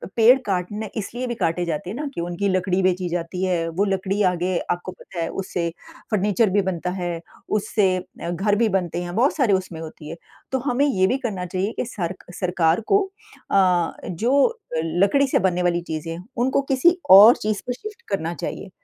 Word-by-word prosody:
पेड़ 235 Hz, +3 st, +7 dB
काटने 205 Hz, +2 st, -2 dB
इसलिए 240 Hz, +4 st, -4 dB
भी 240 Hz, -, -3 dB
काटे 175 Hz, -3 st, 0 dB
जाते 170 Hz, +1 st, -3 dB
हैं 205 Hz, -, -5 dB
ना 300 Hz, -, -3 dB
कि 170 Hz, -, -4 dB
उनकी 175 Hz, +3 st, -2 dB
लकड़ी 185 Hz, 0 st, +1 dB
बेची 185 Hz, -1 st, +1 dB
जाती 175 Hz, +2 st, -3 dB
है। 175 Hz, -3 st, 0 dB
वो 200 Hz, -, +4 dB
लकड़ी 195 Hz, +1 st, -1 dB
आगे 180 Hz, +1 st, -1 dB
आपको 175 Hz, +1 st, -3 dB
पता 185 Hz, -1 st, -10 dB
है 165 Hz, -, -1 dB
उससे 175 Hz, -3 st, -2 dB, 0.4 s
फर्नीचर 210 Hz, +1 st, +2 dB
भी 200 Hz, +2 st, +2 dB
बनता 180 Hz, 0 st, -3 dB
है, 175 Hz, -1 st, -3 dB, 0.3 s
उससे 205 Hz, -2 st, +1 dB
अ, 180 Hz, -1 st, -7 dB
घर 195 Hz, +4 st, +1 dB
भी 225 Hz, +1 st, +2 dB
बनते 175 Hz, -1 st, -3 dB
हैं, 175 Hz, 0 st, -6 dB
बहुत 250 Hz, +6 st, +3 dB
सारी 255 Hz, -9 st, +2 dB
उसमें 185 Hz, -3 st, -2 dB
होती 155 Hz, -1 st, -9 dB
हैं। 165 Hz, -, -7 dB, 0.3 s
तो 265 Hz, -, 0 dB
हमें 255 Hz, +3 st, +2 dB
ये 190 Hz, -10 st, +2 dB
भी 255 Hz, -, +1 dB
करना 190 Hz, -6 st, -2 dB
चाहिए 185 Hz, +3 st, -2 dB
कि -, -, 0 dB
सरक 185 Hz, -6 st, -5 dB, 0.2 s
सरकार 175 Hz, 0 st, +2 dB
को 400 Hz, -, +6 dB, 0.5 s
अ, 180 Hz, -3 st, +3 dB, 0.2 s
जो 270 Hz, -, +2 dB, 0.2 s
लकड़ी 195 Hz, -, +2 dB
से -, -, +2 dB
बनने 180 Hz, -1 st, +1 dB
वाली 175 Hz, -1 st, +1 dB
चीज़ें 160 Hz, -1 st, -5 dB
हैं, 175 Hz, +2 st, -9 dB
उनको 260 Hz, +3 st, +2 dB
किसी 340 Hz, +7 st, +4 dB, 0.2 s
और 220 Hz, +4 st, +9 dB
चीज़ 215 Hz, -2 st, -2 dB
पे 250 Hz, -, 0 dB
शिफ्ट 425 Hz, -, -9 dB
करना 170 Hz, -4 st, -1 dB
चाहिए, 190 Hz, -, -6 dB
185 Hz, 195 wpm, -23 LUFS, 175-220 Hz, 0.5 s, और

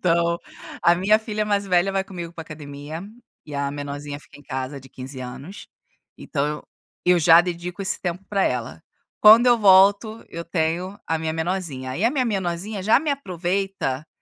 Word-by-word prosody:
Então, 170 Hz, -1 st, +2 dB, 0.4 s
a 170 Hz, -, +6 dB
minha 195 Hz, +5 st, +3 dB
filha 215 Hz, -1 st, -3 dB
mais 205 Hz, -1 st, 0 dB
velha 185 Hz, +1 st, +2 dB
vai 195 Hz, 0 st, 0 dB
comigo 175 Hz, -3 st, -7 dB
pra 165 Hz, -1 st, -7 dB
academia, 150 Hz, +1 st, -8 dB, 0.4 s
e 150 Hz, -, -8 dB
a 140 Hz, 0 st, -1 dB
menorzinha 145 Hz, 0 st, -6 dB
fica -, -, -16 dB
em 145 Hz, -, -16 dB
casa, 130 Hz, 0 st, -5 dB
de 135 Hz, -, -15 dB
15 130 Hz, +1 st, -9 dB
anos. 135 Hz, -, -9 dB, 0.5 s
Então, 140 Hz, -2 st, -2 dB
eu 150 Hz, 0 st, -4 dB, 0.4 s
eu 180 Hz, 0 st, +5 dB
já 165 Hz, +1 st, +7 dB
dedico 175 Hz, +1 st, -5 dB
esse 195 Hz, -, -2 dB
tempo 180 Hz, +1 st, -4 dB
pra 200 Hz, -2 st, +1 dB
ela. 115 Hz, -10 st, -3 dB, 0.4 s
Quando 220 Hz, +3 st, +9 dB
eu 240 Hz, -1 st, +5 dB
volto, 200 Hz, +2 st, +5 dB
eu 170 Hz, -, -7 dB
tenho 170 Hz, +4 st, -2 dB
a 160 Hz, -, 0 dB
minha 160 Hz, 0 st, -3 dB
menorzinha. 160 Hz, -7 st, -3 dB
E -, -, -2 dB
a 230 Hz, -, +4 dB
minha 265 Hz, -2 st, 0 dB
menorzinha 195 Hz, -1 st, -2 dB
já 220 Hz, +4 st, +5 dB
me 305 Hz, +1 st, -2 dB
aproveita, 185 Hz, -, -2 dB
175 Hz, 180 wpm, -23 LUFS, 145-195 Hz, 0.5 s, Quando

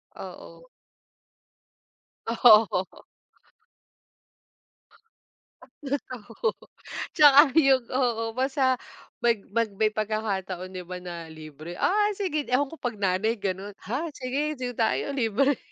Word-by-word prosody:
Oo. -, -, -11 dB, 1.6 s
Oo 220 Hz, -5 st, +4 dB, 2.6 s
At -, -, -17 dB, 0.2 s
least 280 Hz, +1 st, -2 dB
oo, 230 Hz, -, -3 dB, 0.6 s
'tsaka 290 Hz, -2 st, +8 dB, 0.2 s
'yong 270 Hz, -5 st, +5 dB
oo, 245 Hz, -3 st, +1 dB
basta 260 Hz, +1 st, +1 dB, 0.5 s
mag 235 Hz, -2 st, +4 dB, 0.2 s
mag 230 Hz, -1 st, +1 dB
may 215 Hz, +1 st, +2 dB
pagkakataon 195 Hz, -4 st, -3 dB
'di 185 Hz, -1 st, -6 dB
ba, 180 Hz, -, -5 dB
na 170 Hz, -2 st, -8 dB
libre, 155 Hz, +2 st, -10 dB
ay, 415 Hz, +1 st, +1 dB
sige 310 Hz, -9 st, -2 dB
ewan 260 Hz, +3 st, +2 dB
ko 325 Hz, -, -9 dB
'pag 240 Hz, -4 st, -3 dB
nanay 200 Hz, +4 st, 0 dB
gano'n. 195 Hz, +1 st, -4 dB
"Ha, 270 Hz, -, -2 dB
sige, 280 Hz, +4 st, -2 dB
dito 250 Hz, -1 st, -4 dB
tayo, 230 Hz, +5 st, 0 dB
libre." 265 Hz, +2 st, +1 dB
230 Hz, 110 wpm, -26 LUFS, 195-275 Hz, 2.6 s, tsaka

